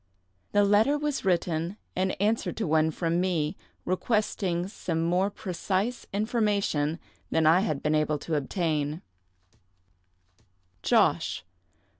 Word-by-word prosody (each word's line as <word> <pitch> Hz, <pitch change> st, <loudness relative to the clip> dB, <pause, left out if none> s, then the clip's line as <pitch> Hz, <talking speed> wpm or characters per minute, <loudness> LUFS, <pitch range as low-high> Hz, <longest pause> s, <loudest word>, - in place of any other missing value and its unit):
The 205 Hz, -, +4 dB
letter 210 Hz, +8 st, +4 dB
was 295 Hz, -1 st, -2 dB
written 175 Hz, 0 st, 0 dB, 0.2 s
in 185 Hz, +1 st, +1 dB
answer 215 Hz, +4 st, 0 dB
to 220 Hz, -, -3 dB
one 160 Hz, 0 st, +3 dB
from 170 Hz, +2 st, 0 dB
me, 175 Hz, -3 st, 0 dB, 0.3 s
requesting 185 Hz, -3 st, 0 dB
some 170 Hz, -5 st, -3 dB
more 180 Hz, +4 st, +2 dB
precise 200 Hz, +4 st, -2 dB
information 200 Hz, -8 st, 0 dB, 0.3 s
than 160 Hz, -, +2 dB
I 160 Hz, +3 st, +6 dB
had 155 Hz, -8 st, -1 dB
been 150 Hz, -, +1 dB
able 155 Hz, 0 st, +1 dB
to 160 Hz, -, -5 dB
obtain:— 150 Hz, +1 st, -1 dB, 1.8 s
"Josh. 90 Hz, -, +2 dB
180 Hz, 115 wpm, -27 LUFS, 160-205 Hz, 1.8 s, I